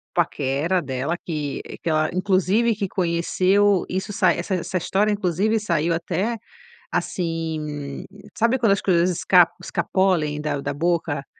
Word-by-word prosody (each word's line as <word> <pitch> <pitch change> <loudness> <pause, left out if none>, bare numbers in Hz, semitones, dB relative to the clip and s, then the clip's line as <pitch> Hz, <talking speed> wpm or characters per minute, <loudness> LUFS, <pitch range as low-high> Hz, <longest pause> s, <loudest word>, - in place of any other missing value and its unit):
paquera 160 +1 0
dela, 135 +4 -2
que, 150 -4 -4
eh, - - -8
que 165 - -3
ela 155 0 +2
inclusive 195 +4 +2
que 200 -3 -2
conheceu 185 +3 +2
isso 190 +2 -3
sai 195 -4 +2
essa 185 +2 -2
essa 185 +1 -3
história, 205 +5 +1
inclusive 205 +3 +1
saiu 170 -4 0
até, 185 +7 -2 0.5
assim, 155 -5 -3 0.3
sabe 235 +3 +2
quando 225 -4 +3
as 200 - -1
coisas 180 -1 +2
esc 170 - -6 0.3
escapolem 170 -4 0
da 145 -2 -2
da 145 0 -3
boca. 160 -2 -1
175 Hz, 140 wpm, -23 LUFS, 155-195 Hz, 0.5 s, quando